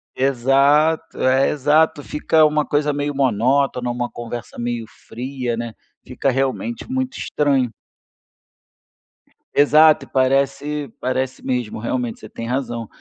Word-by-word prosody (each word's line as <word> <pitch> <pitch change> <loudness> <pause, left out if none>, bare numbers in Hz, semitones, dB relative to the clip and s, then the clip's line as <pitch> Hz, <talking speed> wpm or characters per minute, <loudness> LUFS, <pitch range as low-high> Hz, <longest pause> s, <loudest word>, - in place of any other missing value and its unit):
Exato, 140 +4 +2
é, 130 +1 +3
exato. 150 +1 +2
Fica 155 +2 +2
uma 150 0 +1
coisa 150 0 +1
meio 145 0 -2
monótona, 130 0 +1
uma 120 0 -2
conversa 120 0 -7
meio 120 -1 -3 0.2
fria, 125 -1 -4
né, 115 -1 -5 0.3
fica - - -1
realmente 135 - -2
muito 260 0 -2
estranho. 135 -5 0 1.8
Exato. 155 +2 +5
E - - -25
parece 140 +1 0
parece 130 0 -2
mesmo, 125 -4 -2
realmente, 120 +1 -3
você 110 - -11
tem 115 - -7
razão. 120 -3 -3
135 Hz, 120 wpm, -20 LUFS, 120-145 Hz, 1.8 s, Exato